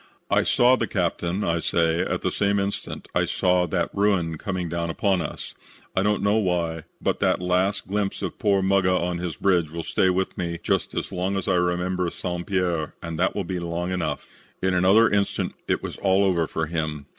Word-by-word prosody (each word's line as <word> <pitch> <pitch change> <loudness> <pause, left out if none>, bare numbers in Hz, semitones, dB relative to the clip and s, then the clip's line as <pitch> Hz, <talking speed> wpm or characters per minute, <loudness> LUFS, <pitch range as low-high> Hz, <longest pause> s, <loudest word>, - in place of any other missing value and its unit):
"I - - +5
saw 125 +1 +4
the - - -1
captain, 90 0 -1
I 85 0 +1
say, 80 0 +1
at - - -2
the - - +1
same 100 0 +1
instant 100 +1 -4
I - - +2
saw 90 -1 +2
that - - -1
ruin 90 -6 +1
coming 95 -4 -3
down 85 0 -2
on 95 -3 +2
us. 75 - -6 0.4
I 95 - +3
don't 105 +1 +1
know 100 +2 +3
why, 85 -5 -1
but - - -1
that - - +2
last 90 +2 +1
glimpse 100 0 -2
of - - -4
poor 100 -4 +2
Muggah 95 -1 +3
on 90 0 -2
his 90 -2 -3
bridge 90 -5 +2
will 85 +1 -5
stay 95 - +2
with 95 +1 0
me 85 -1 -2
just 95 -5 0
as - - -3
long 95 +2 -1
as 95 - -3
I - - +3
remember 90 0 0
St. 90 0 -5
Pierre 90 -5 -1
and 85 -1 -5
that 95 - +1
will 100 - -1
be 90 0 -3
long 85 +1 -3
enough. 85 -5 -2 0.3
"In 95 0 +1
another 95 +6 +5
instant 100 -1 0
it - - 0
was - - -5
all 95 0 +3
over 85 -4 +2
for 80 - -2
him. 80 -2 -3
90 Hz, 205 wpm, -24 LUFS, 85-95 Hz, 0.4 s, I